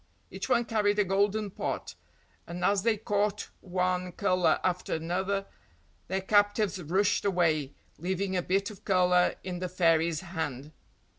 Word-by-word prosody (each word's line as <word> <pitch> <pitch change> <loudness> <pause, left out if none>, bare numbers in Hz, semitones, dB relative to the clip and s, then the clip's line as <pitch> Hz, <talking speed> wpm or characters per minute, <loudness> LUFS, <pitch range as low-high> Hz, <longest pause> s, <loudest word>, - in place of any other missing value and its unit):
Each - - -5
one 240 -2 +3
carried 210 -2 +1
a 210 - +4
golden 200 +2 0
pot, - - -4 0.5
and 175 +1 -3
as 200 -1 +3
they 225 +1 +2
caught 205 0 -1
one 180 -1 -1
colour 185 -2 +2
after 180 -2 -1
another 190 +5 -1 0.6
their 190 +2 -1
captives 205 -1 +2
rushed 190 +5 +1
away, 160 -7 +1 0.2
leaving 190 +3 -2
a 180 - +1
bit 195 +4 0
of 200 - -14
colour 180 -2 +3
in 180 -1 -4
the 185 0 -3
fairy's 165 -2 +2
hand. 160 -6 -5
185 Hz, 145 wpm, -29 LUFS, 175-205 Hz, 0.6 s, a